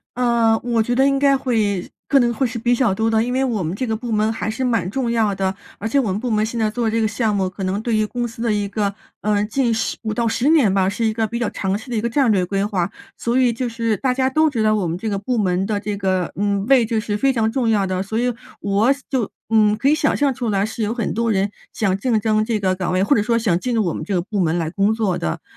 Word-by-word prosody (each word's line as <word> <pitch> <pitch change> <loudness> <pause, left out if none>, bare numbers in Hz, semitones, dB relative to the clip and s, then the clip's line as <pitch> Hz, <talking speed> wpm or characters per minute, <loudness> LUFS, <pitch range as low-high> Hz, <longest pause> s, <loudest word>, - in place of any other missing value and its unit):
呃， 235 -2 +3
我 235 -2 +1
觉 245 +2 0
得 265 +2 +4
应 275 0 +2
该 275 0 +4
会 220 -8 -1 0.2
可 280 - +4
能 240 -2 +2
会 265 +2 0
是 240 0 -5
比 240 +2 +1
较 240 -5 +2
多 225 +2 +1
的。 220 - +3
因 245 +2 -1
为 265 +1 +1
我 230 -7 -1
们 165 +2 -2
这 255 - -2
个 225 - -2
部 235 0 -4
门 215 +1 +2
还 220 - -3
是 225 +4 -3
蛮 230 -8 0
重 240 +2 -1
要 220 -4 +1
的， 190 0 -1 0.2
而 - - -8
且 250 +6 +2
我 250 - 0
们 190 - -1
部 240 +2 -3
门 215 0 +2
现 230 +2 -5
在 220 -2 +1
做 230 0 -1
这 225 +1 0
个 220 - +2
项 215 -1 0
目， 190 -2 0
可 190 +1 -5
能 190 +3 -1
对 225 -1 0
于 215 - +2
公 240 +3 -3
司 230 -1 -8
的 230 -1 +1
一 205 -1 0
个 200 -1 -1 0.3
呃， 205 0 +1
近 240 0 +1
10 225 - -2
5 220 -1 -2
到 235 +2 -1
10 235 +4 0
年 265 -12 +4
吧， 190 -1 +2
是 215 +4 -2
一 220 - +2
个 220 0 -1
比 235 +2 -4
较 235 -3 -1
长 190 0 -2
期 225 +4 -11
的 230 - -1
一 - - +2
个 235 +2 -1
战 265 -2 +2
略 190 -3 +2
规 195 +2 -1
划， 195 -4 -1 0.3
所 235 +2 0
以 250 -2 +4
就 245 +2 -3
是 230 -2 -1
大 260 -2 0
家 260 0 +1
都 310 +3 +3
知 230 -6 -1
道 215 0 +3
我 195 -5 0
们 165 +2 -2
这 220 +3 -3
个 200 - -2
部 240 +4 -2
门 185 -2 +1
的 210 0 -1
这 205 -1 -3
个 185 -3 -1
嗯， 200 -1 0
位 260 -3 +5
置 225 -1 -1
是 210 -2 -2
非 270 +4 +2
常 225 -2 +1
重 240 -1 0
要 205 -3 +2
的， 185 0 -2
所 200 +3 -3
以 245 +1 +1 0.3
我 205 +6 +2 0.2
就 250 -6 -1 0.2
嗯， 215 -2 +4
可 250 +6 +1
以 300 - +4
想 305 -1 +1
象 280 -2 +1
出 245 -2 -4
来， 200 -1 +1
是 225 +1 -6
有 215 +1 0
很 235 -3 -2
多 230 +2 0
人 200 -1 +1 0.2
想 195 -3 0
竞 230 +2 +1
争 215 0 +1
这 225 -1 0
个 190 -2 0
岗 180 -1 -2
位， 185 +1 +2
或 275 +8 +3
者 205 - +3
说 230 +2 +1
想 190 -7 +1
进 250 +2 -2
入 220 - +2
我 170 - -1
们 - - -5
这 200 - -3
个 180 - +1
部 205 +2 -4
门 170 -2 +1
来 165 -2 -1
工 200 +5 +1
作 215 -5 0
的， 80 - -3
220 Hz, 320 characters per minute, -20 LUFS, 200-240 Hz, 0.3 s, 位